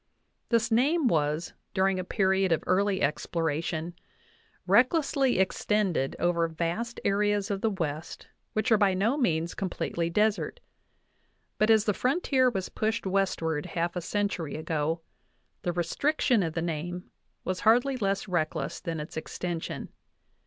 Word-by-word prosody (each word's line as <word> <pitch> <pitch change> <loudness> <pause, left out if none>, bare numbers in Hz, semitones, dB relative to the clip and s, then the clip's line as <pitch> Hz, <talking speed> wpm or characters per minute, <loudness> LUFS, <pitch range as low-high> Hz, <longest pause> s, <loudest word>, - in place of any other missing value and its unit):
This 235 0 +2
name 280 +6 +3
was, 155 -2 0 0.2
during 190 0 +2
a - - -2
period 190 -1 +1
of 165 - +2
early 195 +1 +2
exploration, 160 +2 -1 0.7
recklessly 260 - +3
extended 190 -5 +1
over 170 -1 +1
vast 170 +9 -3
areas 205 +1 +1
of 195 -1 -2
the 225 - +2
West 165 -5 -4 0.3
which 215 +3 0
are 220 - +6
by 195 -3 +3
no 215 +8 +2
means 170 - 0
completely 170 -3 -2
desert; 210 - +1 1.0
but 215 - +3
as 220 -1 +5
the 210 - +2
frontier 260 - +2
was 190 -6 -3
pushed 220 +1 -2
westward 185 -6 0
half 170 0 -2
a 180 - -2
century 200 -4 -2
ago, 160 +1 -1 0.6
the 175 - -1
restriction 245 - +1
of 165 -3 -2
the 165 - -2
name 175 +2 -4 0.3
was 185 0 -2
hardly 245 +5 +4
less 200 -4 -1
reckless 170 -4 -1
than 165 -2 -4
its 150 - -7
extension. 165 +1 -4
190 Hz, 140 wpm, -28 LUFS, 165-220 Hz, 1.0 s, are